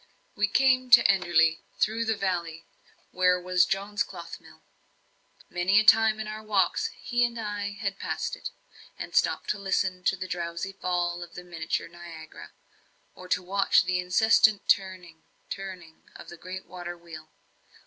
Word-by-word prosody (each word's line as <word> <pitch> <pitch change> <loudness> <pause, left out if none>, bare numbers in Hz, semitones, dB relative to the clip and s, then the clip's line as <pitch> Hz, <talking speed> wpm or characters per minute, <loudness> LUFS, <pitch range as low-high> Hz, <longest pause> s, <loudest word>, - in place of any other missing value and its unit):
We 210 0 +2
came 255 +3 +3
to 245 -1 +9
Enderley 175 -4 +3 0.2
through 225 +2 0
the 220 -1 0
valley, 170 -4 -3 0.5
where 180 0 +3
was 180 0 +2
John's 200 +1 -2
cloth - - -5
mill. - - -18 0.8
Many 180 +3 +2
a - - +3
time 220 0 +5
in 215 - -4
our 215 0 -6
walks 215 - +1
he 245 0 0
and 235 -1 -1
I 205 -2 -4
had 200 -1 -4
passed - - -3
it, - - -6 0.5
and - - -7
stopped - - +1
to 210 - -4
listen 190 -2 -1
to - - +3
the 185 0 -6
drowsy 170 +1 -4
fall 175 -2 -2
of 175 -1 -10
the 180 - -8
miniature 165 -3 -3
Niagara, 165 -2 -11 0.6
or 185 0 -13
watch 190 +2 +2
the 180 0 0
incessant 210 +3 +3
turning 185 -4 0 0.3
turning 185 -4 -8
of - - -11
the 175 - -10
great 185 +2 -8
water 175 -1 -8
wheel. 160 -2 -12
185 Hz, 160 wpm, -27 LUFS, 175-205 Hz, 0.8 s, to